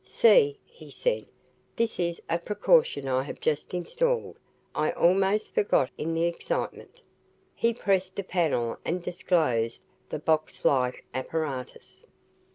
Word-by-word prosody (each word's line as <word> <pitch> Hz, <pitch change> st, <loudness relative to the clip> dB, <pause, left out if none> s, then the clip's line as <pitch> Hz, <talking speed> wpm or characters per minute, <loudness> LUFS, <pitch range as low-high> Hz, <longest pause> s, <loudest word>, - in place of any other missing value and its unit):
"See," 445 Hz, -2 st, +5 dB
he 475 Hz, +1 st, -15 dB
said, -, -, -1 dB, 0.5 s
"this 230 Hz, -4 st, 0 dB
is 170 Hz, -1 st, -1 dB
a 170 Hz, +1 st, 0 dB
precaution 205 Hz, -, +2 dB
I 130 Hz, 0 st, +1 dB
have 140 Hz, -, -7 dB
just 150 Hz, -1 st, -1 dB
installed. 475 Hz, -, -1 dB, 0.4 s
I -, -, +1 dB
almost 195 Hz, +4 st, +2 dB
forgot 140 Hz, -10 st, +2 dB
in 165 Hz, +2 st, -3 dB
the 165 Hz, -, +1 dB
excitement." 170 Hz, -, -4 dB, 0.5 s
He 230 Hz, -, +1 dB
pressed 190 Hz, -4 st, 0 dB
a 200 Hz, -, -1 dB
panel 155 Hz, -11 st, 0 dB
and 175 Hz, +1 st, -2 dB
disclosed 155 Hz, -11 st, 0 dB, 0.3 s
the -, -, -3 dB
box 155 Hz, +1 st, -1 dB
like 125 Hz, -2 st, +2 dB
apparatus. 135 Hz, -1 st, -5 dB
170 Hz, 130 wpm, -27 LUFS, 150-210 Hz, 0.5 s, See